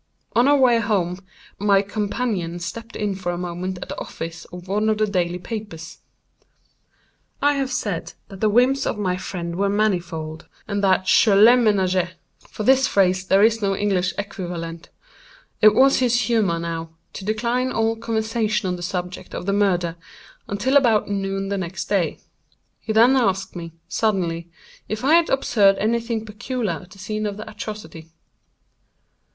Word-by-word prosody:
On 240 +3 +4
our 290 0 +5
way 250 -3 +4
home 190 -5 0 0.4
my 200 -1 +3
companion 205 -4 -2
stepped 225 +7 -7
in 210 -1 -1
for 185 -2 -3
a 175 - -4
moment 180 +1 -4
at - - -13
the - - -5
office 165 0 -7
of 180 +1 -11
one 210 +3 +1
of 215 - +1
the 215 - +2
daily 180 -4 -1
papers. 180 -4 -7 1.4
I 290 0 +3
have 270 -2 -2
said 205 -9 -3
that 195 - -11
the 215 - +2
whims 255 +5 +3
of - - -2
my 185 -3 0
friend 175 -2 -5
were 200 +1 +1
manifold, 175 -6 -1 0.2
and 200 -1 -2
that 190 -1 +3
Je 205 +2 +5
les 215 +5 +8
ménageais:—for 190 -3 -1
this 265 +3 +4
phrase 185 -1 +2
there 195 +2 +5
is 225 0 +3
no 195 -1 +1
English 190 -3 0
equivalent. 175 -4 -6 0.7
It 215 -1 +7
was 270 +3 +5
his 245 -2 +2
humor, 210 -6 +1
now, 165 -1 -4 0.2
to - - -7
decline 235 +5 0
all 225 0 +1
conversation 220 -2 -1
on 180 0 -2
the - - -9
subject 180 0 -5
of - - -5
the 200 - 0
murder, 180 -4 +1 0.5
until 245 +8 +2
about 230 -7 +3
noon 195 0 -2
the 200 -1 -1
next 185 0 -4
day. 195 -5 0 0.6
He 220 - -5
then 235 +4 +5
asked 195 -8 0
me, 170 -2 -7
suddenly, 175 -6 -1 0.4
if 215 +3 -4
I 295 - +4
had 335 0 +5
observed 205 -7 +3
any 230 +3 +1
thing 230 -1 -3
peculiar 210 - -3
at 180 - -16
the 185 - -15
scene 215 +2 -3
of 205 -1 -5
the 215 - -8
atrocity. 205 -7 -8
200 Hz, 170 wpm, -22 LUFS, 180-225 Hz, 1.4 s, les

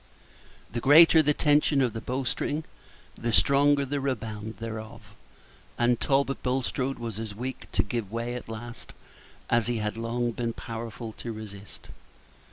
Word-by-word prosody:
The 120 - -2
greater 160 +5 +8
the 150 -1 +2
tension 150 -1 +3
of 125 -4 +2
the 115 - -5
bowstring, 135 +5 -2 0.5
the 120 - -3
stronger 140 +3 +4
the 140 +2 -2
rebound 110 -5 -4
thereof; 110 0 -7 0.6
and 120 0 +2
Talbot 135 0 +1
Bulstrode 130 +1 -1
was 115 -3 -5
as 110 -2 -5
weak 130 +2 -6
to - - +3
give 115 -5 -4
way 115 +1 -3
at 125 -2 -7
last 120 +2 -8 0.5
as 115 -1 +2
he 120 -1 0
had 105 0 -2
long 120 +1 -1
been 115 0 -2
powerful 115 0 -6
to 115 - -4
resist. 105 -2 -10
120 Hz, 150 wpm, -27 LUFS, 110-135 Hz, 0.6 s, greater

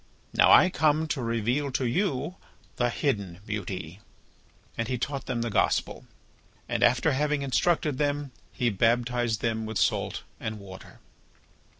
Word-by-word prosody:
Now - - +5
I 185 - +7
come 155 0 +2
to 140 - -1
reveal 120 +5 0
to 130 - 0
you 150 - -1 0.4
the 120 0 +2
hidden 100 - -2
beauty." 95 -4 -5 0.8
And 115 - -2
he 125 - -1
taught 135 +2 -4
them 120 -1 -1
the 115 - -3
Gospel. - - 0 0.6
And - - -2
after 125 +6 +4
having 145 +1 0
instructed 145 +1 +1
them, 145 -1 -1 0.2
he 120 -1 0
baptized 120 +2 +1
them 110 -1 -1
with 110 -1 -3
salt - - 0 0.2
and 110 0 -4
water. 95 -2 -12
120 Hz, 140 wpm, -27 LUFS, 110-145 Hz, 0.8 s, I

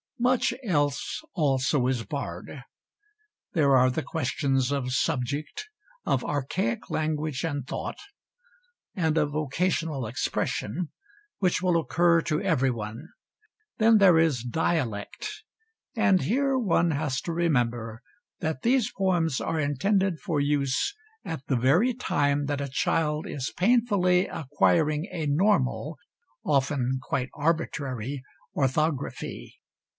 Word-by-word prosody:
Much 250 0 +2
else 145 - 0
also 140 -4 +1
is 125 -3 0
barred. 125 - -6 0.9
There 140 -4 +4
are 130 0 +5
the 135 +5 -2
questions 135 -2 0
of 135 -3 -1
subject, 145 - -2 0.4
of - - +1
archaic 130 -5 -2
language 155 -3 -1
and 145 -5 -2
thought, - - -5 1.0
and 160 -5 +1
of 150 -1 +1
occasional 155 -2 -1
expression, 130 - -2 0.5
which 185 -2 +1
will 180 -2 +3
occur 170 +3 +3
to 150 -1 -1
everyone. 130 - -1 0.7
Then 225 0 +5
there 190 -5 +6
is 150 -8 +2
dialect, 160 - -2 0.5
and 215 -5 +3
here 270 +4 +1
one 175 -7 +2
has 145 -3 -1
to 170 - -4
remember 120 -8 0 0.4
that 160 -5 -2
these 245 -1 +2
poems 175 -7 +1
are 160 - -1
intended 180 +5 +1
for 165 -7 -1
use 145 - 0 0.3
at 160 -5 -6
the 135 - +1
very 160 - +3
time 145 - 0
that 145 0 -2
a 140 - -3
child 150 +3 0
is 135 -1 -4
painfully 195 -4 +3
acquiring 150 +2 +1
a 160 -3 -3
normal 155 -2 +1 0.5
often 135 -2 +1
quite 130 0 -2
arbitrary 145 -5 -2 0.3
orthography. 140 +1 -2
150 Hz, 115 wpm, -27 LUFS, 135-175 Hz, 1.0 s, there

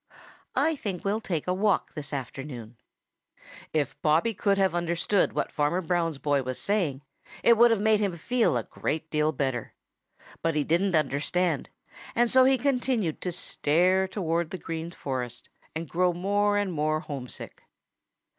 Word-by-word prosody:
I 320 0 +2
think 200 - -5
we'll 210 +3 0
take 170 -8 -2
a 180 - +1
walk 200 +1 +1
this 145 -3 -5
afternoon." 130 -3 -6 1.0
If 145 -3 -1
Bobby 160 +9 +3
could 200 0 +1
have 190 -2 +2
understood 175 +3 +1
what - - -1
Farmer 150 +4 +1
Brown's 170 -3 0
boy 145 -1 +1
was 130 -1 -4
saying, 170 -10 0 0.4
it 235 - +7
would 235 +2 +6
have 225 -3 +2
made 215 0 +3
him 195 -5 -1
feel 225 - +1
a 115 - -1
great 160 +7 -4
deal 150 0 +2
better. 130 -5 -3 0.7
But 165 -1 0
he 150 - +2
didn't 175 +4 +1
understand, 155 +2 0 0.5
and 240 0 +3
so 260 -1 +6
he 265 0 +4
continued 250 - 0
to 180 - -2
stare 180 +3 +2
towards 170 -4 -1
the 185 - -5
Green 165 -1 -5
Forest 125 -7 -5 0.3
and 160 +1 -4
grow 180 +3 +1
more 205 +3 +1
and 200 -3 0
more 155 0 0
homesick. 135 -6 -7
170 Hz, 160 wpm, -27 LUFS, 150-200 Hz, 1.0 s, it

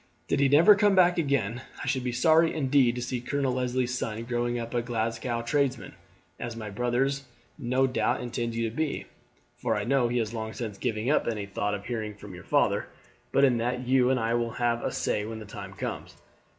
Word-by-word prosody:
Did - - +1
he 140 -1 +4
never 165 +9 +8
come 205 -1 +3
back 180 -1 +5
again 130 -6 0 0.2
I - - -5
should 130 -2 0
be 125 - -1
sorry 160 +6 +4
indeed 135 -4 +3
to 125 - -3
see 125 0 -3
Colonel 135 0 -1
Leslie's 125 0 -1
son 115 -2 -3
growing 120 0 -1
up 115 -1 -5
a 120 - +1
Glasgow 115 0 -2
tradesman, 135 0 0 0.5
as 120 -1 -5
my 110 -2 -6
brother 125 +5 +1 0.5
no 130 0 +2
doubt 125 - 0
intends 120 -1 -3
you 115 0 0
to 110 - -7
be, 155 -2 -2 0.5
for - - 0
I - - -1
know 130 -1 +2
he 120 +1 -1
has 115 -1 -1
long 110 -1 -4
since 110 -5 -6
given 115 -2 -2
up 150 - +2
any 105 -3 -2
thought 100 +1 -2
of 100 - -8
hearing 110 -3 -4
from 100 -1 -11
your 90 - -10
father; - - +1 0.4
but 140 - +3
in 130 -3 +5
that 125 +2 -2
you 130 -1 +4
and 130 -1 +2
I 115 0 0
will 120 -1 0
have 120 -1 0
a - - -1
say 105 - -1
when 110 +1 -5
the 110 - -8
time 100 -1 -8
comes. - - -5
120 Hz, 215 wpm, -27 LUFS, 115-130 Hz, 0.5 s, never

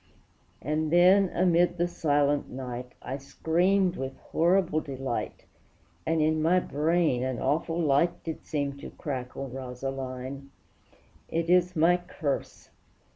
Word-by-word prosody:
And 155 +3 -1
then, 185 +3 +6
amid 175 0 +2
the 175 +1 +1
silent 145 -4 +1
night, 125 -1 -6
I 135 - -4
screamed 180 +6 +1
with 135 0 -5
horrible 170 -1 +1
delight, 135 -4 -4 0.6
And 160 -1 +2
in 155 0 +2
my 175 +4 +4
brain 155 -4 +1
an 130 -1 -2
awful 165 +5 0
light 155 +1 +2
Did 160 -1 -5
seem 140 -2 -3
to - - -8
crackle, 135 -1 -5
Rosaline! 130 +1 -6 0.8
It 165 +1 0
is 180 0 +3
my 170 +3 +4
curse! 175 -5 -4
155 Hz, 125 wpm, -28 LUFS, 135-175 Hz, 0.8 s, then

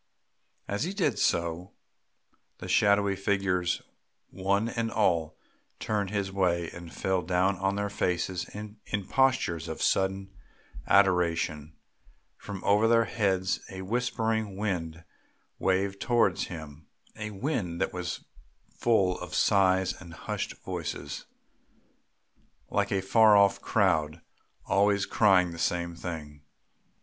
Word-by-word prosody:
As 100 +5 -1
he 185 +4 -3
did 155 - 0
so, 85 +2 0 0.8
the - - -8
shadowy 100 -1 +3
figures 95 -3 0 0.5
one 100 +4 0
and 115 -1 -2
all 85 -8 +1 0.4
turned 105 -3 -1
his 100 -1 -2
way 85 -3 0
and 85 -1 -10
fell 95 -1 -1
down 90 +2 +1
on 95 +1 0
their 100 0 -1
faces 90 -1 -1
in 105 +1 -9 0.3
postures 130 - +2
of - - -5
sudden 95 0 0 0.5
adoration; 85 -5 +2 0.6
from 100 -2 -8
over 105 +2 +4
their 115 0 +4
heads 95 -3 0
a 95 0 -7
whispering 110 -2 -1
wind 85 -6 -3 0.6
waved 95 +1 0
towards 115 -7 +2
him, 80 -3 -9 0.3
a 110 0 -5
wind 100 - -3
that - - -1
was 90 -1 -5 0.5
full 95 -6 +2
of - - -7
sighs 95 -2 +3
and 85 -3 -11
hushed - - -4
voices, - - -5 1.4
like - - 0
a 95 -1 0
far 110 +1 +6
off 100 -1 +4
crowd 80 -6 +1 0.5
always 100 0 +2
crying 95 -5 +4
the 85 - -8
same 85 0 -1
thing. 75 -4 -7
95 Hz, 120 wpm, -28 LUFS, 85-105 Hz, 1.4 s, far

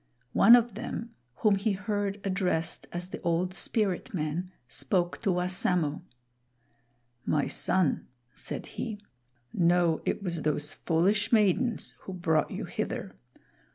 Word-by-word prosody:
One 235 - +9
of 240 -2 +2
them, 230 +2 -5 0.3
whom 205 -2 +6
he 205 +1 +1
heard 205 +1 -2
addressed 185 -4 -1
as 175 +1 -4
the - - -7
Old 175 +2 0
Spirit 205 +2 -1
man, 160 +3 -2 0.2
spoke 175 +8 -1
to - - 0
Wassamo. 180 -3 0 1.2
"My 150 -2 +1
son," 185 -6 +1 0.3
said - - -5
he, 220 -3 -5 0.6
"know 175 -2 +3
it - - -1
was 170 -4 -2
those 150 -1 -1
foolish 195 +6 +1
maidens 225 +2 +2
who 190 - -8
brought 160 -4 +1
you - - -4
hither. - - -4
180 Hz, 125 wpm, -29 LUFS, 170-205 Hz, 1.2 s, One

